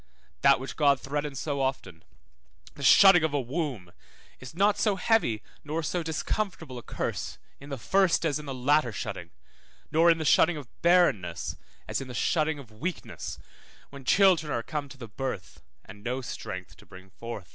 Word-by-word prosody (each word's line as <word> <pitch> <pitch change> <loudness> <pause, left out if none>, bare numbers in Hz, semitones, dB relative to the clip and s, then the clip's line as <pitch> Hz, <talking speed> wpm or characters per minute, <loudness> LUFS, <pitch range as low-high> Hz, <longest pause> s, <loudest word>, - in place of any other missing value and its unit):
That - - +5
which 130 - -7
God 140 -3 +4
threatens 145 +1 -3
so 140 -1 -2
often, 100 -11 -3 0.7
the - - -12
shutting 190 -4 +7
of 155 -2 0
a - - +2
womb, 130 - -4 0.5
is 130 +4 -10
not 200 +3 +3
so 210 -3 +2
heavy 180 - +1 0.2
nor 155 +2 -3
so 175 +3 -1
discomfortable 160 - -3
a - - -10
curse - - -4 0.2
in 140 - -12
the 140 - -4
first 190 +5 +2
as 150 -2 0
in 150 - -9
the 135 - -4
latter 135 0 +2
shutting, - - -6 0.6
nor 165 +2 +5
in 165 - +5
the 160 - -3
shutting 160 +3 +4
of 140 -4 -8
barrenness 170 - +2 0.3
as - - -2
in 135 - -7
the 125 - -8
shutting 155 +4 +1
of 130 -6 -12
weakness, 155 +11 -5 0.5
when 140 -1 -10
children 180 -1 +4
are 115 - -1
come 145 0 -4
to 135 - -12
the 120 -3 -8
birth, 110 -3 -6 0.2
and 105 +1 -13
no 125 +3 -2
strength 95 -7 -7
to - - -18
bring 95 +1 -14
forth. 115 -3 -8
140 Hz, 180 wpm, -28 LUFS, 125-165 Hz, 0.7 s, shutting